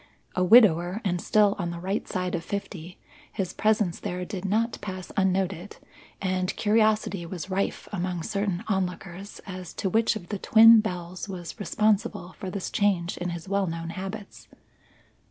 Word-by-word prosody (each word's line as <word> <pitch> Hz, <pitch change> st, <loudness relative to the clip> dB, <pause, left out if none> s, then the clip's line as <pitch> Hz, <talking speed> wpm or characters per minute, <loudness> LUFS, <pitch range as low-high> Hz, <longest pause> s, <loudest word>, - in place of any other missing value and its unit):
A 185 Hz, -, +2 dB
widower 180 Hz, -3 st, +6 dB
and 180 Hz, -2 st, 0 dB
still 210 Hz, -1 st, +3 dB
on 175 Hz, -2 st, -1 dB
the 170 Hz, 0 st, -5 dB
right 190 Hz, +4 st, -2 dB
side 180 Hz, -1 st, -2 dB
of 170 Hz, -2 st, -2 dB
fifty, 185 Hz, -2 st, -6 dB, 0.3 s
his 185 Hz, -2 st, -3 dB
presence 215 Hz, -5 st, +1 dB
there 180 Hz, +1 st, -4 dB
did 190 Hz, 0 st, -6 dB
not 225 Hz, +4 st, 0 dB
pass 185 Hz, -2 st, -6 dB
unnoted, 190 Hz, -1 st, 0 dB, 0.4 s
and 185 Hz, -1 st, -1 dB
curiosity 215 Hz, -3 st, +2 dB
was 185 Hz, +1 st, -6 dB
rife 195 Hz, +1 st, -1 dB
among 180 Hz, -3 st, -2 dB
certain 200 Hz, -2 st, -2 dB
onlookers 190 Hz, -1 st, -3 dB
as 185 Hz, -3 st, -8 dB
to 190 Hz, -, -2 dB
which 225 Hz, +2 st, +3 dB
of 185 Hz, -5 st, -8 dB
the 205 Hz, -, -3 dB
twin 225 Hz, +2 st, +8 dB
belles 180 Hz, -1 st, -5 dB
was 175 Hz, -3 st, -7 dB
responsible 205 Hz, -1 st, 0 dB
for 190 Hz, -, -4 dB
this 190 Hz, +1 st, -4 dB
change 190 Hz, -4 st, +1 dB
in 180 Hz, -, -3 dB
his 170 Hz, 0 st, -6 dB
well 200 Hz, 0 st, +1 dB
known 165 Hz, 0 st, -4 dB
habits. 195 Hz, +3 st, -7 dB
190 Hz, 160 wpm, -26 LUFS, 180-205 Hz, 0.4 s, twin